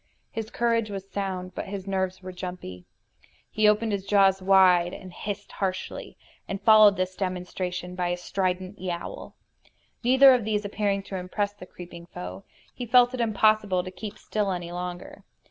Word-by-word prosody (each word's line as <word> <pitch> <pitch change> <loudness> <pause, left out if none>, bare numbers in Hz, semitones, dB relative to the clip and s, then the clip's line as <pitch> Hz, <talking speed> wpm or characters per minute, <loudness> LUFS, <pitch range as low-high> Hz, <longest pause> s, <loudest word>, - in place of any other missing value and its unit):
His 220 -1 -5
courage 230 -2 0
was 195 -1 -6
sound, 190 -2 -4
but - - -5
his 195 -1 -6
nerves 190 -1 -2
were 185 - -6
jumpy. 180 - -7 0.7
He 215 0 +3
opened 210 +1 +3
his 200 -2 -2
jaws 195 -1 +4
wide 185 -2 +5
and 185 -1 -11
hissed 205 +1 -6
harshly, 185 -2 -4 0.3
and 195 - -4
followed 215 -1 +7
this 185 0 -2
demonstration 180 -1 -4
by 180 -1 -1
a 175 0 -1
strident 185 +1 -2
yowl. 175 -2 -6 0.7
Neither 265 +2 +7
of 250 -3 +1
these 210 -1 -1
appearing 200 -1 -1
to 195 - -6
impress 200 +3 -2
the 190 -3 -12
creeping 170 -1 -11
foe, 90 - -8 0.3
he 245 - -6
felt 245 +1 +5
it 255 - -2
impossible 215 -4 +2
to 185 - -7
keep 205 +2 -8
still 210 -2 -2
any 175 -2 -4
longer. 180 0 -6
190 Hz, 165 wpm, -26 LUFS, 180-210 Hz, 0.7 s, followed